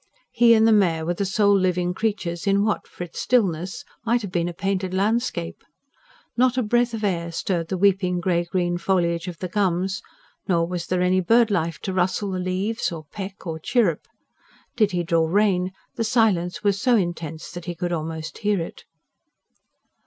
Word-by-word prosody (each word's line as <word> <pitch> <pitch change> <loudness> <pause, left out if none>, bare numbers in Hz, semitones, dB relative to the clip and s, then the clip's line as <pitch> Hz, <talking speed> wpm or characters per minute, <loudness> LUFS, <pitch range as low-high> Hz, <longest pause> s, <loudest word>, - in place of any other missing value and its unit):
He 235 0 +6
and 220 0 +5
the - - +5
mare 170 -7 +3
were 175 - 0
the 200 +3 -2
sole 200 +1 +3
living 180 -2 +1
creatures 190 -4 -2
in 200 0 +3
what, 215 - -1
for - - -7
its 175 - -8
stillness, 190 -3 0 0.2
might 235 0 +1
have 200 - -5
been 175 -1 0
a - - -4
painted 190 +1 -2
landscape. 205 - -1 0.7
Not 255 +1 +2
a 255 - +2
breath 240 +2 +1
of 220 - -6
air 170 -4 -1
stirred 165 0 -2
the 190 - -2
weeping 185 -2 +2
grey 175 -1 +1
green 175 0 -1
foliage 170 -1 0
of 175 -2 -6
the 185 - -4
gums; 190 0 0 0.5
nor 170 -3 +2
was 175 0 -4
there 180 0 +1
any 185 +1 +3
bird 225 +4 +4
life 165 -4 0
to 190 - -3
rustle 185 +2 0
the 185 - -2
leaves, 185 +5 -1
or 160 -2 -7
peck, 195 0 -7
or 160 -2 -4
chirrup. 185 - +1 0.7
Did 215 -4 +3
he 175 -3 -1
draw 165 -1 +2
rein, 185 0 +2 0.2
the 230 - -2
silence 210 -6 +1
was 200 0 +1
so 250 -1 +4
intense 170 -5 -3
that 175 -1 -8
he 175 - -4
could 175 0 -3
almost 160 -1 -4
hear 210 -2 +1
it. 165 - -7
185 Hz, 190 wpm, -23 LUFS, 175-205 Hz, 0.7 s, He